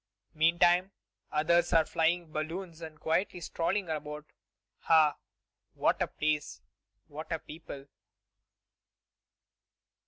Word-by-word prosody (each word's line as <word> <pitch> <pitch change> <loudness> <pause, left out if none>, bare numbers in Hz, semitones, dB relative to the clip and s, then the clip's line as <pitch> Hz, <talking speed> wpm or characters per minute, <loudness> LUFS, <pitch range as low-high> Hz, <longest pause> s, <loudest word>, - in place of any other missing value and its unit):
Meantime, 175 +4 +3 0.4
others 170 +3 +3
are 165 -1 +5
flying 165 0 0
balloons 165 +2 -5
or 160 - -5
quietly 175 +4 0
strolling 175 +3 -1
about. 150 -1 -5 0.6
Ah! 155 -2 +6 0.6
what - - +1
a - - +2
place! 150 -1 -2 0.4
what 155 +3 -9
a 165 - +1
people!" 150 -3 -10
160 Hz, 95 wpm, -31 LUFS, 155-175 Hz, 0.6 s, Ah